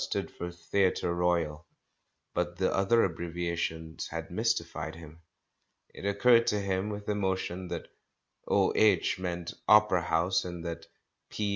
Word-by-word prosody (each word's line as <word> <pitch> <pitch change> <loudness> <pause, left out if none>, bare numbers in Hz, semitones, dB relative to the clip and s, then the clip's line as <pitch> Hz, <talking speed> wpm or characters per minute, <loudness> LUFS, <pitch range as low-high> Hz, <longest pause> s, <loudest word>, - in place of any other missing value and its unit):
stood - - -2
for 85 - -5
"Theatre 90 0 0
Royal," 85 -3 0 0.7
but 90 0 -2
the 95 - +1
other 115 +4 +4
abbreviations 85 -2 -3
had - - -6
mystified 80 - -1
him. 80 -1 -12 0.7
It - - -10
recurred 115 +4 +4
to 105 - +2
him 100 +1 -1
with 105 0 -6
emotion 95 -3 -1
that 85 -1 -5 0.6
"O.H." - - +3
meant 90 -2 -4
"Opera 105 -4 +6
House," 90 +3 +1
and 85 -1 -6
that 85 -1 -5 0.4
"P. 105 -1 -2
90 Hz, 130 wpm, -30 LUFS, 85-100 Hz, 0.7 s, Opera